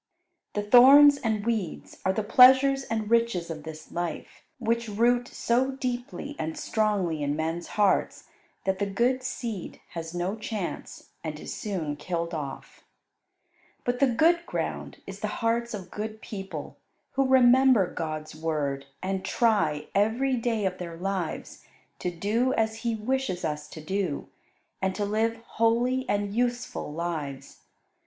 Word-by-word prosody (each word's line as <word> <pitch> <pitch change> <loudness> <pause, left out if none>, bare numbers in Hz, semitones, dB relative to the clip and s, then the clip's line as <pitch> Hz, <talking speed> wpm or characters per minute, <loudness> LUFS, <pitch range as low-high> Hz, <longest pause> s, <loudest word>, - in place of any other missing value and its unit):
The 205 - -1
thorns 275 +6 +8
and 220 -5 -1
weeds 220 -8 -3
are 190 - +2
the 215 +3 -1
pleasures 265 +4 +7
and 220 -2 -2
riches 230 -8 +2
of 155 -1 -6
this 155 0 -10
life, 175 -1 -5 0.2
which 235 -1 0
root 240 +3 +2
so 260 +3 0
deeply 255 +2 -4
and 160 0 -3
strongly 200 -8 0
in 145 0 0
men's 165 +2 -2
hearts 205 -2 +2 0.4
that 190 0 0
the 200 - 0
good 240 +6 +1
seed 235 -6 -5
has 165 0 -6
no 180 +4 -1
chance, 215 -4 -6
and 155 -2 -5
is - - -6
soon 165 -8 -3
killed 170 +2 -3
off. 145 -4 -6 1.0
But 245 0 -1
the 275 - +5
good 330 +8 +3
ground - - -4
is - - -8
the - - -2 0.2
hearts 235 +1 +1
of 185 -3 -9
good 215 +1 -5
people, 195 -8 -7 0.3
who 270 0 +1
remember 260 -3 +6
God's 155 -2 -5
Word 145 -4 -2 0.2
and 190 0 -2
try, 165 -11 +1
every 230 +6 +2
day 230 -3 -1
of 185 -1 -2
their 170 -2 -6
lives, 185 -2 -4 0.4
to 180 - -1
do 210 +9 0
as 220 0 0
He 230 0 -1
wishes 220 -4 -1
us 150 -1 -3
to 155 - -10
do, 180 -1 -2 0.5
and 190 0 0
to 205 - -1
live 220 +2 +1
holy 240 +3 +1
and 205 0 0
useful 245 -7 -1
lives. 150 -5 -5
210 Hz, 150 wpm, -27 LUFS, 170-240 Hz, 1.0 s, thorns